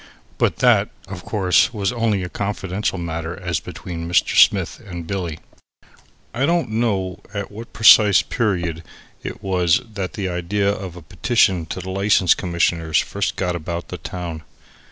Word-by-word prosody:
But - - +2
that, - - +4 0.2
of 95 -2 -8
course, 95 -2 +2
was 100 +1 0
only 115 -5 0
a - - -3
confidential 100 0 -3
matter 85 0 -4
as 90 -4 -2
between 85 -2 -7
Mr. 85 - +2
Smith - - +4
and 85 -5 -7
Billy. 85 -4 -3 1.0
I 130 +4 +1
don't 170 -9 +1
know 100 -5 -1 0.2
at 100 0 -4
what 115 +3 -9
precise 105 -2 +7
period 90 -8 -1 0.4
it - - -7
was 90 -3 +2
that 95 -3 -4
the 100 -2 -3
idea 90 +3 0
of 95 -4 -6
a 90 - -11
petition 95 -4 +1
to 95 - -5
the 95 +1 -6
License 100 -2 +3
Commissioners 85 -2 0
first - - -1
got 90 -2 -1
about 85 +1 -5
the - - -6
town. 85 -3 -6
95 Hz, 155 wpm, -21 LUFS, 85-105 Hz, 1.0 s, precise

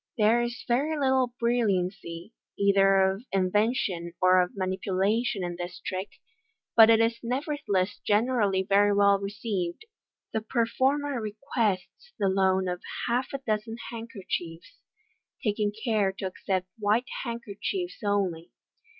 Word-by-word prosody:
— - - -58
There 225 +2 +4
is 240 +1 -4
very 285 +6 +1
little 260 -3 +1
bulliancy, 195 -6 -1 0.3
either 195 -1 +4
of 195 +2 -6
invention 190 -2 0
or 185 0 +5
of 180 +2 -3
manipulation, 190 +3 0
in 175 -1 -4
this 175 +1 -6
trick, 185 +1 -4 0.7
but 225 -1 +9
it 225 -1 +6
is 230 0 +2
nevertheless 240 - -1
generally 210 -3 +2
very 200 +1 +3
well 200 -1 +4
received. 200 - -4 0.5
The 220 - 0
performer 260 +4 0
requests 215 - -3
the 200 -4 +1
loan 190 0 +2
of 180 0 -3 0.3
half 245 +2 +1
a 275 - -2
dozen 220 +1 -2
handkerchiefs, 215 - -6 0.6
taking 210 -2 0
care 215 -2 0
to 195 - -6
accept 185 0 -2
white 215 +4 +2 0.2
handkerchiefs 235 - -4
only. 190 -5 -1
205 Hz, 125 wpm, -27 LUFS, 190-235 Hz, 0.7 s, but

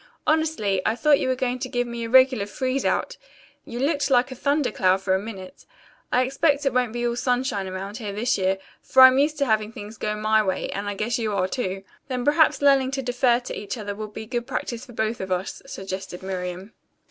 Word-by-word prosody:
"Honestly, 305 -12 +1
I 220 - +1
thought 290 +3 +4
you - - -1
were 260 - +1
going 255 0 -2
to 255 - -4
give 245 0 0
me 235 -1 -5
a - - -5
regular 255 -4 +5
freeze 260 +5 -2
out. - - 0 0.5
You 235 - -7
looked 285 +3 0
like 250 0 +3
a - - -6
thunder 280 -1 0
cloud 190 -2 +2
for 190 -1 +1
a 190 - +2
minute. 195 -3 -9 0.5
I 250 - +3
expect 285 +2 +1
it 270 - +1
won't 250 -2 +1
be 240 +1 -2
all 235 0 0
sunshine 245 -5 -1
around 195 +3 -6
here, 215 -4 -5
this 235 +6 0
year, 190 0 +1 0.2
for 260 - +6
I'm 260 +1 +8
used 300 +2 +2
to 280 - +1
having 215 -2 +1
things 210 0 -9
go 210 0 -1
my 215 +1 +2
way, 190 -3 -2
and 205 +1 -3
I 205 - -4
guess 230 +4 -1
you 215 -3 -1
are, 185 -1 +1
too." 195 -4 -3 0.2
"Then 250 -2 -3
perhaps 300 0 +3
learning 275 -2 +5
to 270 -1 -2
defer 245 -1 +2
to 250 - -6
each 205 +3 -5
other 205 -2 -4
will 215 +1 -6
be 220 +1 -8
good 240 +1 -3
practice 235 0 -4
for 240 - -12
both 220 +1 -2
of 190 0 -5
us," 185 +1 -2
suggested 190 -1 -6
Miriam. 185 +2 -5
235 Hz, 230 wpm, -24 LUFS, 200-260 Hz, 0.5 s, I'm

